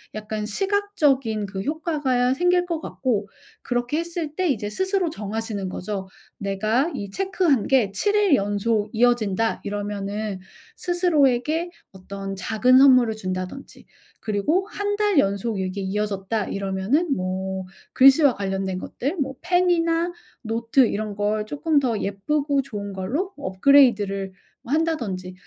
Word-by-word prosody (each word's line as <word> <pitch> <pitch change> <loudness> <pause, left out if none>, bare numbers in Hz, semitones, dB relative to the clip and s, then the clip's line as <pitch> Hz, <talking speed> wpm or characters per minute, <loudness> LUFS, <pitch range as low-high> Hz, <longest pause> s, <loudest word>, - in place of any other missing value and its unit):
약간 215 0 -4
시각적인 290 - 0
그 195 -1 -5
효과가 285 - 0
생길 355 +4 +2
것 335 -3 -2
같고 220 -10 -2 0.3
그렇게 245 +5 -1
했을 335 -3 -4
때 365 -3 0
이제 210 -6 -1
스스로 380 - 0
정하시는 210 - -4
거죠. 190 +1 -5 0.3
내가 215 - 0
이 200 -1 -5
체크한 365 - +1
게 245 -8 +3
7 410 - 0
일 410 -5 +4
연속 205 +1 0
이어진다. 225 -2 +1
이러면은 205 0 -4 0.4
스스로에게 325 -3 +1 0.2
어떤 195 +1 -7
작은 235 +6 +3
선물을 255 -5 +6
준다든지 185 +5 -6 0.3
그리고 225 - 0
1 410 0 -2
달 415 -5 +2
연속 200 0 0
이게 190 +1 -3
이어졌다. 205 +1 -2
이러면은 200 - 0
뭐 190 +1 -3 0.3
글씨와 275 +1 +6
관련된 195 -1 -2
것들 290 - -4
뭐 270 -2 -2
펜이나 350 -1 +2 0.3
노트 230 +3 +1
이런 210 0 -3
걸 210 +1 -1
쪼끔 295 +5 +1
더 235 -6 -1
예쁘고 275 +8 0
좋은 205 -6 -6
걸로 270 - -2
업그레이드를 200 -2 +3 0.3
뭐 260 - -5
한다든지 235 - -1
230 Hz, 285 characters per minute, -23 LUFS, 200-300 Hz, 0.4 s, 선물을